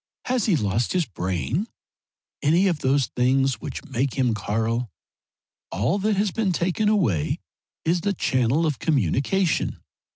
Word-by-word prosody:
Has 250 -3 0
he 195 - +4
lost 105 -2 0
his 180 -3 +1
brain 95 - -2 0.7
any 165 +6 +3
of 170 -5 0
those 135 0 +2
things 135 +1 +1
which - - -6
make 130 +2 -1
him 125 -4 +2
Karl? 110 +3 -1 0.8
All 125 - 0
that 210 +1 +1
has 200 0 +1
been 205 0 0
taken 185 +5 +1
away 115 - +1 0.5
is 170 +2 +2
the 200 +2 0
channel 130 0 +1
of 150 -4 -1
communication. 155 - +1
140 Hz, 140 wpm, -24 LUFS, 115-185 Hz, 0.8 s, he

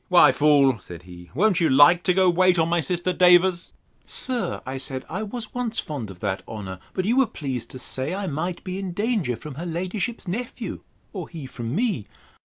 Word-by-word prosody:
—Why 175 -6 +7
fool, 140 -4 +4
said 85 -2 -11
he, 90 -1 -12
won't 195 +3 +3
you 165 - +3
like 145 +6 +7
to 180 - +4
go 185 -1 +5
to - - -6
wait 185 0 +4
on 165 -1 +3
my 170 0 +2
sister 175 +3 -1
Davers? 180 0 +4 0.3
Sir, 255 -2 -2 0.2
said 130 -1 -2
I, - - -4
I - - -3
was 220 +2 -6
once 245 -2 -2
fond 135 -9 -4
of 90 -2 -12
that 95 -2 -2
honour; 95 -4 -7 0.2
but 185 - -1
you 235 +5 +2
were 265 -2 +5
pleased 130 - -5
to - - -7
say, 130 +3 -3
I 200 0 -3
might 175 +2 -3
be 185 0 -4
in 190 -3 -4
danger 205 - 0
from 150 +4 -9
her - - -4
ladyship's 185 +6 -3
nephew, 240 +8 -4 0.3
or - - -6
he 160 -5 -8
from 120 -1 -5
me. 205 - 0
175 Hz, 210 wpm, -24 LUFS, 130-190 Hz, 0.3 s, Why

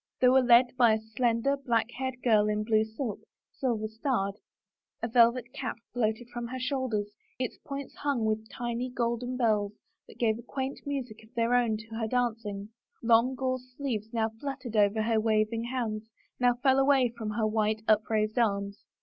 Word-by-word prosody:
They 250 - +6
were 260 +1 +6
led 245 0 +5
by 235 -3 +6
a 220 - +1
slender, 230 +4 0
black 240 -4 0
haired 260 0 -5
girl 215 -3 +4
in 210 0 0
blue 215 0 +3
silk, 220 +1 -4 0.3
silver 230 -5 -1
starred. 220 -3 -1 0.7
A - - +1
velvet 240 +1 +3
cape - - -3 0.2
floated 225 0 -1
from 240 -1 -5
her 260 +2 -5
shoulders, 255 -6 -2 0.2
its 255 -2 -3
points 280 -1 -7
hung 280 -6 0
with 220 0 -1
tiny 240 +1 -3
golden 245 +1 -2
bells 210 -4 +1 0.3
that - - -15
gave 225 -1 +1
a - - -7
quaint 265 +3 -4
music 255 -6 -4
of 220 - -20
their 235 +1 +2
own 235 -3 +3
to 225 +1 -10
her 225 - -1
dancing; 220 -4 -2 0.3
long 235 +3 +4
gauze 255 -1 -3
sleeves 225 -6 -3
now 225 -1 0
fluttered 270 -4 -5
over 210 +1 +3
her 225 0 +2
waving 220 +1 +1
hands, 225 -3 -3 0.3
now 245 -1 +4
fell 265 +2 +3
away 270 -2 +4
from 220 -2 -4
her 215 +1 0
white, 215 0 0
upraised 215 +1 +2
arms. 200 -3 0
230 Hz, 175 wpm, -29 LUFS, 220-250 Hz, 0.7 s, They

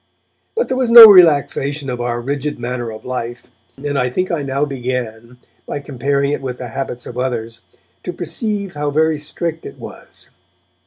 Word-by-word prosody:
But 470 - 0
there 260 - -2
was 255 -2 0
no 235 -1 +12
relaxation 145 - +4
of 125 -2 -4
our 120 0 -2
rigid 140 +3 -3
manner 120 0 -4
of 110 - -11
life, 120 -1 -5 0.3
and 145 0 -3
I 125 0 0
think 185 +9 -2
I 165 -3 -1
now 140 +1 -1
began, 125 -3 -5 0.3
by 145 - -4
comparing 140 0 -1
it 145 - -2
with 125 -2 -5
the 125 -1 -7
habits 125 0 -5
of 125 - -7
others, 115 -3 -4 0.4
to 180 - -5
perceive 195 +3 -3
how 145 0 -2
very 155 +1 +1
strict 165 +2 -4
it - - -10
was. - - -11
140 Hz, 175 wpm, -17 LUFS, 125-160 Hz, 0.4 s, no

